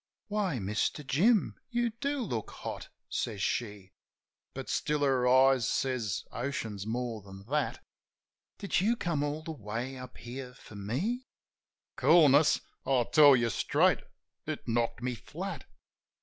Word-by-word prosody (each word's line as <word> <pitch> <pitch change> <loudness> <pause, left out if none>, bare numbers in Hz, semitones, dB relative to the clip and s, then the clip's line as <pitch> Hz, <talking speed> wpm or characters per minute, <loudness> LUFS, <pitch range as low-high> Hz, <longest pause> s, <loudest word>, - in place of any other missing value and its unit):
"Why, 205 -8 0
Mister 105 +8 -1
Jim? 190 - +2
You 240 -1 0
do 280 +5 -2
look 120 - -3
hot," - - -7 0.2
says 110 -4 -3
she. 105 -2 -2 0.6
(But - - -6
still 150 0 0
her 130 -3 +3
eyes 130 -2 +5
says 125 -7 -1
oceans 115 -6 -4
more 115 -1 -3
than 95 0 -12
that). 150 -1 -1 0.7
"Did 200 -2 0
you 225 +5 +3
come 170 -9 -1
all 145 +2 -2
the 165 - -5
way 120 0 -5
up 130 0 -10
here 125 +1 -8
for 110 - -15
me?" 150 - -2 0.7
Coolness? 150 -2 +6 0.2
I 130 -3 +2
tell 145 -3 +8
you 120 -2 +1
straight, - - +3 0.5
it - - -4
knocked 115 +1 0
me 125 0 -1
flat. 155 - -6
130 Hz, 135 wpm, -30 LUFS, 115-160 Hz, 0.7 s, tell